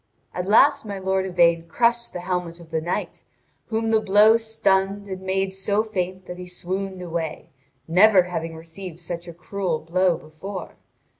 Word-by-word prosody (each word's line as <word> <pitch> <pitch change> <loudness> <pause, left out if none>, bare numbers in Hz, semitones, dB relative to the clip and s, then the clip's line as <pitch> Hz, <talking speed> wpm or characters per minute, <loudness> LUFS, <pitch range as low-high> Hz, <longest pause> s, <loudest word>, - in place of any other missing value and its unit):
At 180 +1 -3
last 280 +7 +5
my 205 -2 -5
lord 190 0 0
Yvain 170 -2 +3
crushed 235 +6 +1
the 180 - -6
helmet 180 -2 -3
of 165 -1 -15
the 160 -1 0
knight, 170 +3 -3 0.5
whom 225 0 -1
the 220 - +5
blow 210 +2 +6
stunned 200 -3 +1
and 190 -1 -6
made 190 0 -1
so 200 +2 0
faint 185 -3 -3
that 180 0 -8
he 180 - -7
swooned 185 +1 -4
away, 165 -2 -4 0.4
never 185 +3 +6
having 165 -2 -4
received 165 +1 -9
such 170 0 -6
a - - -6
cruel 175 0 -2
blow 175 +2 +1
before. 170 +5 -8
185 Hz, 165 wpm, -23 LUFS, 170-200 Hz, 0.5 s, blow